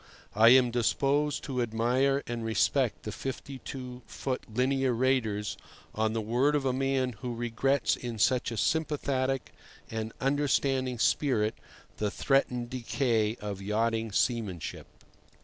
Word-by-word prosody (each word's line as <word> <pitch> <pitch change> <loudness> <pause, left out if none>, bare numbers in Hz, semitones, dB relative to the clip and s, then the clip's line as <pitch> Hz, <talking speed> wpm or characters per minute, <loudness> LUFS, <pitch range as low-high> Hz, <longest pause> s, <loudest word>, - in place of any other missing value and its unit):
I 110 +3 +7
am 125 -1 +6
disposed 140 +5 +1
to 130 -3 -2
admire 125 +5 +1
and 120 -1 -4
respect 110 -3 +1
the - - -4
52 130 -1 -6
foot 130 -2 -3
linear 130 +2 +1
raters 115 -4 0 0.4
on 110 0 0
the 115 - -1
word 125 +7 +2
of 140 -2 0
a 130 - +2
man 135 -1 0
who 125 -2 -4
regrets 120 +2 +1
in 120 -2 -5
such 125 +4 +2
a 115 - -5
sympathetic 140 -2 0 0.4
and 110 0 -3
understanding 135 -2 +1
spirit 110 -3 +2 0.4
the 105 - 0
threatened 125 0 0
decay 115 -3 0
of 100 -2 -5
yachting 110 +2 0
seamanship. 105 -5 -1
125 Hz, 130 wpm, -29 LUFS, 115-135 Hz, 0.4 s, I